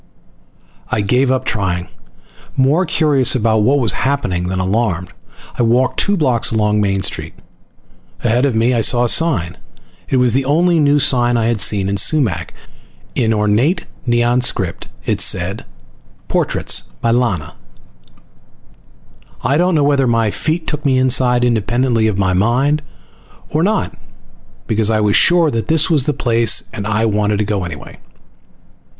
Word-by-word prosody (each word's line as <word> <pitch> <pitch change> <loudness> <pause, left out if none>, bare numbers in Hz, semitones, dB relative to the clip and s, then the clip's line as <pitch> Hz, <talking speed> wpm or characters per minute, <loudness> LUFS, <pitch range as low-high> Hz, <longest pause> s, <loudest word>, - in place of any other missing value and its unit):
I 110 - -1
gave 125 +6 +1
up 130 0 -1
trying, 90 -5 -2 0.7
more 150 +7 +2
curious 145 -7 +2
about 110 -2 +1
what 130 +7 +2
was 120 -6 +1
happening 120 -10 -2
than 95 0 -3
alarmed. 95 -2 -2 0.5
I - - +3
walked 120 +2 +1
two 200 0 +1
blocks 130 -8 +1
along 105 -1 +1
Main 100 -1 -1
Street. - - -3 0.9
Ahead 120 +2 +1
of 135 -5 0
me 115 +3 +2
I 115 - +1
saw 120 +2 +3
a - - +1
sign. 110 - 0 0.5
It 130 - +1
was 125 -2 +2
the 135 +2 +1
only 165 +5 +2
new 145 -1 +3
sign 120 -3 +2
I 115 - 0
had 115 -3 0
seen 95 +1 +2
in 100 +1 -2
Sumac. 115 - +1 0.6
In 115 -3 0
ornate 110 - 0 0.2
Neon 120 +1 +1
script 95 - -1 0.2
it - - -1
said, - - 0 0.6
"PORTRAITS - - +1 0.2
by 115 - 0
Lana." 115 - -1 1.9
I 130 +4 +1
don't 175 +2 +1
know 150 - +2
whether 140 -2 +2
my 115 -3 +1
feet 160 +7 -3
took 150 -1 -4
me 135 -3 +1
inside 125 -1 +2
independently 120 0 0
of 105 -3 -2
my 95 -2 0
mind 125 +10 +1 0.7
or 155 - 0
not, 205 +2 -1 0.7
because 110 -1 0
I 110 -1 +1
was 105 -1 +1
sure 170 -3 +3
that 115 -2 -3
this 160 +2 +1
was 145 -5 +2
the - - +2
place 115 -2 +2
and 105 -2 -5
I 110 +1 0
wanted 105 -1 0
to 105 - -1
go 100 -2 -2
in 90 - -5
anyway. 75 -4 -11
120 Hz, 160 wpm, -16 LUFS, 105-135 Hz, 1.9 s, I